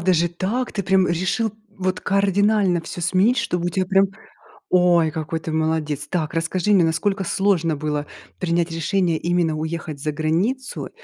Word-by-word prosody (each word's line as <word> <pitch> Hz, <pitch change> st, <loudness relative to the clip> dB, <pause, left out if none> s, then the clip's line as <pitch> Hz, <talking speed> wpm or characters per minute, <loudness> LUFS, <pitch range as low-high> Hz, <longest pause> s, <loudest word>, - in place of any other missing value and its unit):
даже 175 Hz, -1 st, +2 dB
так? 205 Hz, +9 st, -2 dB
Ты 200 Hz, -, -2 dB
прям 190 Hz, 0 st, +3 dB
решил 190 Hz, +6 st, 0 dB, 0.2 s
вот 185 Hz, -1 st, -2 dB
кардинально 200 Hz, -2 st, +2 dB
всё 170 Hz, -, -7 dB
сменить, 185 Hz, +8 st, +3 dB
чтобы 175 Hz, -4 st, -1 dB
у -, -, +2 dB
тебя 185 Hz, +2 st, -1 dB
прям 195 Hz, +1 st, +4 dB, 0.7 s
Ой, 175 Hz, -3 st, +4 dB
какой 160 Hz, +1 st, -4 dB
ты 160 Hz, -, -5 dB
молодец. 155 Hz, -2 st, -1 dB
Так, 160 Hz, -5 st, -2 dB
расскажи 170 Hz, +4 st, -1 dB
мне, 190 Hz, -4 st, +5 dB
насколько 195 Hz, +4 st, 0 dB
сложно 175 Hz, -3 st, +1 dB
было 150 Hz, 0 st, -3 dB, 0.3 s
принять 170 Hz, -1 st, 0 dB
решение, 165 Hz, +1 st, 0 dB
именно 170 Hz, -2 st, 0 dB
уехать 160 Hz, -1 st, -4 dB
за 150 Hz, +2 st, -2 dB
границу? 175 Hz, -, -1 dB
175 Hz, 160 wpm, -22 LUFS, 160-195 Hz, 0.7 s, мне